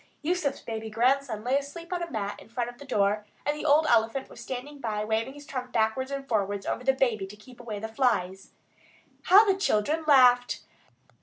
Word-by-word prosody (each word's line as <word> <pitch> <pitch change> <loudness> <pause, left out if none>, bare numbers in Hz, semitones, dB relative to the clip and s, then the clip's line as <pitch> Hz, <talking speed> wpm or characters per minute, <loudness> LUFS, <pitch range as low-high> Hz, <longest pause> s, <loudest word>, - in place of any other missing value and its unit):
Yusuf's 330 -3 -1
baby 220 -1 -5
grandson 240 0 +1
lay 260 +4 +2
asleep 335 +5 -8
on 355 - -2
a 340 - -4
mat 205 -5 -4
in - - -16
front 235 +1 -2
of 245 - -21
the 285 - -10
door, 210 -4 +1 0.2
and 295 +1 +1
the 300 - -6
old 305 +1 +4
elephant 225 +4 +1
was - - -11
standing 280 +3 -6
by 215 -4 -2
waving 225 +5 -1
his 290 0 -12
trunk 255 -2 -5
backwards 225 +4 0
and 275 -1 -5
forwards 205 -4 -1
over - - -3
the 265 - +4
baby 240 -7 0
to 200 - -11
keep 235 +4 -16
away 230 -3 -6
the 220 +2 -4
flies. 220 -6 -1 0.8
How 400 +4 +8
the 395 - +3
children 315 - 0
laughed! 250 -3 +5
245 Hz, 205 wpm, -27 LUFS, 220-280 Hz, 0.8 s, How